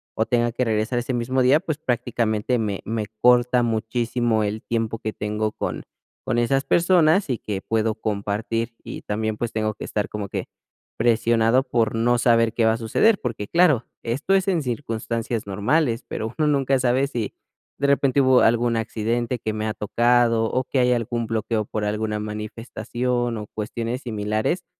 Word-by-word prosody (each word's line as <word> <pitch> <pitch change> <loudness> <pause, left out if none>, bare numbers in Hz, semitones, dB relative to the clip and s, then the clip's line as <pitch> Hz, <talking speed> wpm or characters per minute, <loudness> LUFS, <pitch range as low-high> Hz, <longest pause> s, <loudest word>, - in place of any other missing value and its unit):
o 110 - +1
tenga 120 -1 +1
que 125 +2 -1
regresar 110 +2 0
ese 125 +2 -3
mismo 125 +2 0
día, 135 +5 +4
pues, 160 -5 -3
prácticamente 120 -4 -1
me 105 -3 -2
me 110 -1 -2
corta 125 0 +4
muchísimo 115 0 0
el 105 +1 -2
tiempo 115 -1 -2
que 110 - -4
tengo 105 +1 -2
con - - -4 0.4
con 115 - 0
esas 135 +3 +2
personas, 175 +2 +3
y 120 - -1
que 100 -2 -4
puedo 110 0 0
compartir, 110 +2 -2
y - - -7
también, 110 +1 -2
pues, 120 -2 -3
tengo 110 -1 -1
que - - -9
estar 105 - -2
como 105 -2 -5
que - - -4 0.5
presionado 115 +1 +3
por 115 -4 0
no 120 +2 +2
saber 115 -2 +3
qué 115 -1 +1
va 110 - +4
a 115 - -2
suceder, 195 - +2
porque 110 -5 -4
claro, 160 -7 +3 0.2
esto 135 +11 -1
es 190 0 +1
en 175 -4 +1
circunstancias 115 -3 -3
normales, 115 +6 +1
pero, 110 +2 -4
uno 155 - +2
nunca 135 -2 +2
sabe 130 +2 +2
si, 120 -7 -4 0.5
de 140 - +1
repente 140 -1 +3
hubo 130 -1 +5
algún 120 +1 +3
accidente 115 +3 -2
que 110 0 -3
me 110 0 -3
ha 110 - -1
tocado, 120 +2 +2
o 130 0 0
que 135 - -1
hay 125 0 +3
algún 120 -1 -1
bloqueo 110 -1 -1
por 105 - -4
alguna 105 0 -2
manifestación, 115 +3 -3
o 105 - -6
cuestiones 115 +4 -4
similares, 110 - -1
115 Hz, 175 wpm, -23 LUFS, 110-125 Hz, 0.5 s, hubo